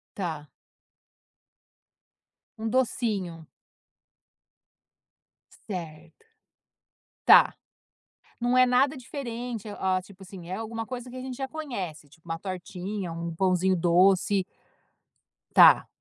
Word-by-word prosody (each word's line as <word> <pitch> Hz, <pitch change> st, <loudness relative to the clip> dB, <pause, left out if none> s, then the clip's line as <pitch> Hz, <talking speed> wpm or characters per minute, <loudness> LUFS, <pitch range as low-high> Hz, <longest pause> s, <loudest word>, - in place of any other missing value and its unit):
Tá. 160 Hz, -6 st, -4 dB, 2.1 s
Um 220 Hz, -, -4 dB
docinho. 210 Hz, -9 st, -1 dB, 2.2 s
Certo. 165 Hz, -, -8 dB, 1.0 s
Tá. -, -, +8 dB, 0.9 s
Não 245 Hz, +1 st, +1 dB
é 255 Hz, -, +7 dB
nada 260 Hz, +3 st, +2 dB
diferente, 240 Hz, -4 st, -6 dB
hã, 190 Hz, -2 st, -1 dB
tipo 195 Hz, +1 st, -16 dB
assim, 185 Hz, -3 st, -10 dB
alguma 225 Hz, +3 st, -4 dB
coisa 250 Hz, 0 st, -7 dB
que 255 Hz, -, -10 dB
a -, -, -5 dB
gente 255 Hz, -1 st, -6 dB
já 270 Hz, -, -3 dB
conhece, 240 Hz, -, -6 dB
tipo 160 Hz, +4 st, -23 dB
uma 165 Hz, 0 st, -3 dB
tortinha, 185 Hz, +1 st, -5 dB
um 170 Hz, 0 st, -5 dB
pãozinho 185 Hz, +1 st, +2 dB
doce. 185 Hz, +3 st, +3 dB, 1.1 s
Tá. -, -, +7 dB
195 Hz, 95 wpm, -27 LUFS, 175-245 Hz, 2.2 s, Tá